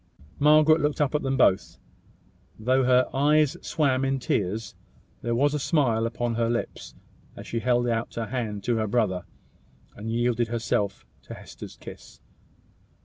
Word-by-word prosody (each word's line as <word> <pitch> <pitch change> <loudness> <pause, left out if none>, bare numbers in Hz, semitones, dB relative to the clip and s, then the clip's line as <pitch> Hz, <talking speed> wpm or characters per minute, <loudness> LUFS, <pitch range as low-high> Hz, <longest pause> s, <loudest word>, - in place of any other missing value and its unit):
Margaret 155 +2 +5
looked 150 0 -1
up 145 -1 +1
at 150 - +1
them 135 0 -1
both. 95 -7 +2 0.8
Though 130 +4 +1
her 125 0 +4
eyes 150 +1 +3
swam 135 -4 0
in 135 0 0
tears, 105 -3 -2 0.5
there 120 0 -1
was 145 +4 +2
a 150 - -1
smile 125 -7 +1
upon 120 0 -2
her 115 0 0
lips 120 0 -4 0.4
as - - -10
she 115 - -3
held 120 0 +1
out 115 -1 -2
her 115 - -2
hand 110 -5 -4
to 120 +1 0
her 110 -1 -1
brother, 100 -5 0 0.7
and 105 +2 -6
yielded 120 0 0
herself 110 - -2 0.2
to - - -10
Hester's - - -11
kiss. - - -12
120 Hz, 155 wpm, -26 LUFS, 115-135 Hz, 0.8 s, Margaret